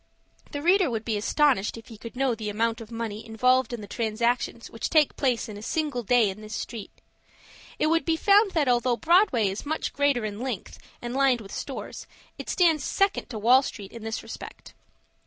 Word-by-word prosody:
The 290 0 -5
reader 365 -1 +4
would 225 -2 -3
be 225 - -1
astonished 230 0 +2
if 225 - -12
he 225 - -10
could 230 +2 -9
know 265 -1 +1
the 215 -2 -4
amount 230 +2 -1
of 220 - -10
money 225 -2 -5
involved 250 +4 +2
in 240 -2 -5
the 205 - -9
transactions 235 +2 -1
which 230 - -4
take 310 -3 +3
place 250 -5 0
in 210 -2 -8
a - - -9
single 290 +1 -2
day 235 -2 +3
in 200 +3 -11
this 215 0 -7
street. 225 -4 -6 0.9
It - - +1
would 330 +1 +2
be 330 - +1
found 400 +4 +4
that 305 -5 +1
although 245 0 +2
Broadway 330 - +3
is 195 +1 -4
much 310 +2 -3
greater 280 -5 +1
in 210 0 -5
length, 250 -6 -5 0.2
and 240 0 -4
lined 265 -2 +3
with 200 -3 -11
stores, - - -6 0.3
it - - -7
stands 325 -6 +3
second 395 +5 0
to 235 - -5
Wall 245 +5 +5
Street 205 -7 -7
in 230 - -9
this 225 0 -4
respect. - - -10
240 Hz, 205 wpm, -26 LUFS, 220-285 Hz, 0.9 s, Wall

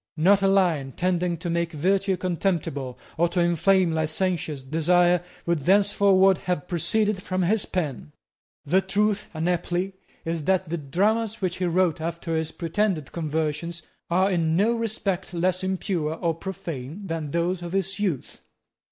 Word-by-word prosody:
Not 195 +5 +5
a 195 - +3
line 170 -9 +2
tending 180 -1 0
to 165 - -6
make 170 0 -1
virtue 190 +5 +1
contemptible, 165 -8 -2 0.2
or 170 0 +3
to 180 - -1
inflame 175 +1 +3
licentious 160 -2 -1
desire, 175 +5 +3 0.2
would 170 -2 +1
thenceforward 195 +2 +4
have 180 -5 -2
proceeded 205 +3 0
from 185 -1 -1
his 205 +4 +1
pen. 140 - -3 0.5
The 185 +6 +3
truth 205 +2 0
unhappily 175 +3 -1 0.3
is 165 -2 -2
that 190 +1 +2
the 170 - 0
dramas 210 - 0
which 185 -2 -1
he 185 - -1
wrote 175 -2 +1
after 165 0 -3
his 160 0 -1
pretended 170 -3 -1
conversion 155 0 -2 0.4
are 185 +3 +3
in 165 -3 +1
no 205 +6 +3
respect 205 -6 -2
less 185 +2 +1
impure 185 -4 -1
or 165 0 0
profane 165 -1 -6
than 165 -4 -3
those 170 +3 -1
of 175 0 -6
his 195 +1 -1
youth. 180 -11 -2
175 Hz, 150 wpm, -25 LUFS, 160-190 Hz, 0.5 s, Not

